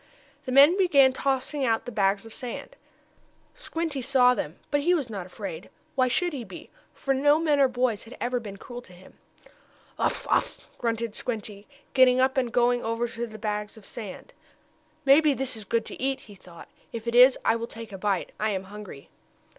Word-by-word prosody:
The 255 - -4
men 285 +8 +7
began 280 -8 +5
tossing 270 +2 -1
out 225 -3 +1
the 245 - -6
bags 200 -1 +1
of 225 - -8
sand. 250 - -6 0.8
Squinty 325 - -4
saw 250 -1 +4
them, 160 -9 -4
but 290 0 +2
he 350 +5 +3
was 275 -8 -3
not 195 -4 -5
afraid. 480 - -7 0.2
Why 255 -2 +2
should 350 +7 0
he 265 -4 -4
be? 190 -5 -11 0.2
for 275 - -1
no 290 +3 +4
men 310 -3 +2
or 275 - +6
boys 245 -4 -1
had 230 - -12
ever 245 +1 -1
been 205 -4 -8
cruel 245 +4 -9
to 185 - -16
him. 180 +1 -17 0.8
"Uff! - - 0
Uff!" - - 0
grunted 230 -2 -2
Squinty, 215 -4 -5 0.3
getting 255 -1 +5
up 260 +1 +3
and 250 -3 0
going 245 0 +2
over 230 +1 -1
to 230 - -11
one 235 - 0
of - - -15
the 215 - -8
bags 210 0 -4
of 215 - -14
sand. 215 -6 -9 0.7
"Maybe 285 +1 +6
that 260 -2 -2
is 215 -2 -9
good 230 +2 0
to - - -9
eat!" 270 0 -1
he 210 - -14
thought. 175 -3 -14 0.2
"If 230 -1 -6
it 235 - -1
is 250 +2 +7
I - - +4
will 230 0 -4
take 230 -2 -10
a 195 - -7
bite. 195 -3 -1
I 215 - +1
am 190 -2 -2
hungry." 205 -10 -10
245 Hz, 205 wpm, -26 LUFS, 215-270 Hz, 0.8 s, men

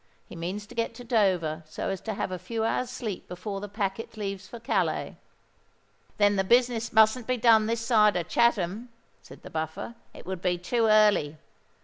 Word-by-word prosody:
He - - -11
means 185 +5 -4
to - - -14
get 230 0 -2
to 245 - -9
Dover 185 -10 +1
so - - -4
as 195 - -3
to 220 -2 -4
have 190 - -3
a 185 - -4
few 220 +5 -3
hours' 245 +2 0
sleep 215 -7 -5
before 195 +3 -5
the 205 - -6
packet 205 +2 -4
leaves 195 -2 -5
for 235 - -9
Calais." 230 - -1 1.0
"Then 205 -1 +3
the 195 - +2
business 235 +1 +2
mustn't 220 +2 +4
be 255 0 +1
done 220 -2 +5
this 230 0 -1
side 210 -4 +4
of 170 -2 -2
Chatham," 225 +1 +1 0.3
said 95 - -15
the - - -10
Buffer: 160 +7 -4 0.2
"it - - -11
would 185 -2 -5
be 180 -1 +1
too 225 +6 0
early. 210 -8 +4
210 Hz, 195 wpm, -27 LUFS, 185-230 Hz, 1.0 s, done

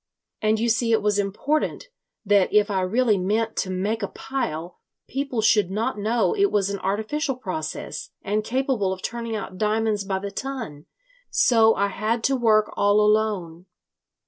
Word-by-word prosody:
And 215 0 +2
you 235 - +1
see 230 +1 +1
it 220 -2 +2
was 205 -1 +2
important 280 - -1 0.4
that 200 -2 +3
if 210 0 +3
I 190 -1 +1
really 215 +2 +2
meant 220 +4 0
to 190 - -1
make 200 +5 -1
a 200 - -1
pile, 175 -12 -4 0.3
people 265 -4 -2
should 210 -3 +4
not 210 +2 -2
know 225 - +1
it 400 -1 +2
was 200 -1 +1
an 200 - -3
artificial 220 +10 -1
process 180 -10 -5
and 210 +2 -1
capable 250 -5 0
of 185 - -10
turning 230 -1 -4
out 195 -3 -6
diamonds 215 -1 +1
by 195 -1 -2
the 200 +1 -5
ton. 225 - -6 0.4
So 225 -2 +4
I 200 0 +1
had 220 +3 -2
to 270 - +2
work 215 -4 +3
all 205 +1 +3
alone. 210 -5 +1
215 Hz, 170 wpm, -24 LUFS, 195-230 Hz, 0.4 s, should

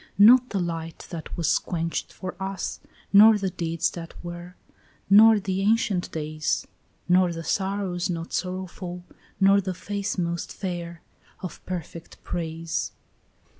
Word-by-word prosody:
"Not 240 +5 +7
the 200 - -2
light 165 -2 -4
that 165 -3 -6
was 170 - +2
quenched 165 -2 -3
for 185 -1 -7
us, 195 -1 -3 0.3
nor 215 +2 +9
the 195 -2 -2
deeds 170 -2 -1
that 165 -1 -8
were, 175 +1 -7 0.6
Nor 220 +1 +8
the 190 -1 -2
ancient 205 -3 +1
days, 155 0 -2 0.4
Nor 180 0 +4
the 165 0 -5
sorrows 190 -1 -1
not 165 -1 -4
sorrowful, 180 -1 -4 0.4
nor 195 +1 +5
the 185 -1 -4
face 200 +2 -3
most 170 -1 -2
fair 170 -3 -5 0.4
Of 185 - -7
perfect 170 -2 -6
praise." 165 -1 -3
180 Hz, 130 wpm, -25 LUFS, 170-195 Hz, 0.6 s, nor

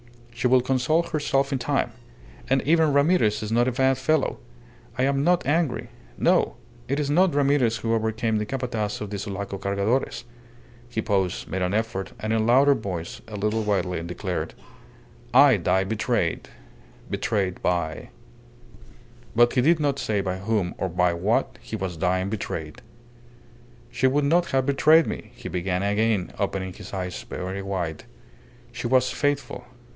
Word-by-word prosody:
She 125 - 0
will 125 0 +5
console 130 +6 +1
herself 140 -4 0
in 135 - 0
time. 120 - 0 0.6
And 135 0 +2
even 160 -1 +3
Ramirez 140 - +3
is 105 - -4
not 120 +2 +3
a - - +2
bad 130 +1 +2
fellow. 145 +2 +1 0.6
I 125 - +1
am 140 +1 +1
not 175 -1 +2
angry. 135 -6 0 0.3
No! - - +2 0.3
It 140 +3 -1
is 145 -1 -1
not 175 0 +3
Ramirez 140 -5 +2
who 115 0 -1
overcame 110 0 0
the 105 - -2
Capataz 120 -5 -2
of 105 -1 -5
the 100 - -3
Sulaco 100 0 -5
Cargadores." 100 +8 -1 0.7
He 120 - -3
paused, 95 -4 0
made 95 - -3
an 90 +2 0
effort, 110 -3 -2
and 110 +1 -2
in 110 0 +1
louder 135 +4 +6
voice, 90 -9 -5
a 110 - -8
little 105 +2 0
wildly, 95 -5 -1
declared 85 -1 -4 0.8
"I - - +7
die 95 +1 +1
betrayed 110 +3 -1 0.6
betrayed 100 -5 -1
by 85 -3 -1 0.6
" - - -23
But 120 +1 +5
he 125 - +3
did 160 +5 +4
not 140 -2 0
say 105 -2 0
by 95 -1 -2
whom 100 -3 -1
or 95 - -1
by 90 0 +2
what 85 - 0
he - - -6
was 95 -2 -4
dying 95 +2 0
betrayed. 80 -7 -5 1.1
"She 130 +2 +2
would 140 +2 +2
not 170 +4 +3
have 135 -1 +1
betrayed 155 +3 +5
me," - - -5
he - - -8
began 90 +1 -1
again, 105 -1 +1
opening 95 -2 -2
his - - -11
eyes 90 -1 -4
very 95 +2 -5
wide. 90 -5 -4 0.7
"She 120 0 -4
was 130 +1 +3
faithful. 145 -3 -2
110 Hz, 160 wpm, -25 LUFS, 95-135 Hz, 1.1 s, I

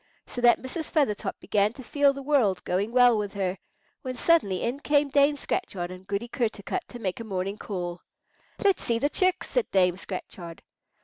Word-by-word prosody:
So 245 - -6
that 240 0 +6
Mrs. 300 +5 -5
Feathertop 275 -10 0
began 205 +1 +1
to 260 - -10
feel 285 +2 +3
the 275 0 -7
world 255 -10 +2
going 195 +5 -1
well 245 -1 +6
with 205 -1 -4
her, 190 -1 -2 0.4
when 255 -1 -5
suddenly 245 - +2
in 245 +4 -2
came 290 -1 +2
Dame 285 +1 +3
Scratchard 180 - -3
and 185 +1 -11
Goody 200 +4 -2
Kertarkut 235 - -3
to 245 - -9
make 195 -4 -3
a - - -5
morning 195 -1 -3
call. 175 -3 -5 0.6
"Let's 395 -2 +3
see 235 - +1
the 285 +5 +1
chicks," 370 +3 +1
said - - 0
Dame 180 -2 +3
Scratchard. 180 -3 -8
230 Hz, 185 wpm, -27 LUFS, 190-280 Hz, 0.6 s, that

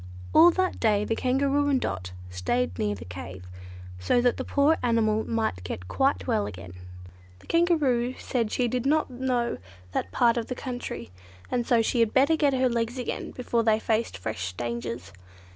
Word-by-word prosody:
All 330 +2 +8
that 370 +1 0
day 210 -2 +2
the 225 - 0
Kangaroo 275 +3 +1
and 270 -2 +3
Dot 95 - -4 0.2
stayed 90 +2 -1
near 105 -1 0
the 90 -4 -10
cave, 90 +1 -8 0.5
so 90 - +2
that 245 0 +2
the - - -3
poor 295 +3 +3
animal 220 -3 +2
might 220 - -1
get 90 0 -6
quite 270 - +1
well 220 -5 0
again. 90 0 -9 0.6
The - - -20
Kangaroo 285 -8 +2
said 230 -4 -2
she 250 - +1
did 250 +2 -1
not 305 -1 +2
know 245 -1 -1 0.3
that 90 - -2
part 235 - +3
of 230 - -2
the 250 - -4
country, 245 - -6 0.4
and 240 -2 0
so 235 -2 +4
she 240 - 0
had 230 -2 +2
better 280 +5 +5
get 290 -3 +2
her 260 0 +3
legs 235 +1 -1
again 250 - -4
before 240 -2 -1
they 220 -1 +3
faced 220 +1 -1
fresh 95 -5 -4
dangers. 120 +2 -5
235 Hz, 180 wpm, -26 LUFS, -, 0.6 s, All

